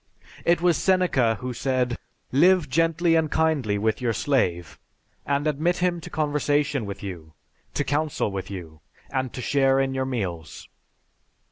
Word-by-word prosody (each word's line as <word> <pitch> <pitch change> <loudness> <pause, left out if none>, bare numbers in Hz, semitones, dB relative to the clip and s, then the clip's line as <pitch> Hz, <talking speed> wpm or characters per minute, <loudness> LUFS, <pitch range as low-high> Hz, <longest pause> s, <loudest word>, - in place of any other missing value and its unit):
It 170 0 +3
was 175 -2 +3
Seneca 175 -12 +2
who 125 0 -3
said, 125 -1 0 0.4
"Live 175 +4 +4
gently 165 +4 +2
and 160 -1 +2
kindly 145 -11 +1
with 110 +3 0
your 120 -2 +1
slave, 90 - 0 0.5
and 140 +1 0
admit 155 +4 +1
him 175 -1 0
to - - -9
conversation 145 -4 0
with 100 0 -7
you, 85 -5 -7 0.4
to - - +1
council 145 -5 -1
with 95 -1 -5
you, 80 -5 -8 0.3
and 130 -2 -1
to 125 - -5
share 135 0 +3
in 135 0 0
your 130 0 -1
meals." 95 -11 -4
135 Hz, 150 wpm, -25 LUFS, 110-155 Hz, 0.5 s, Live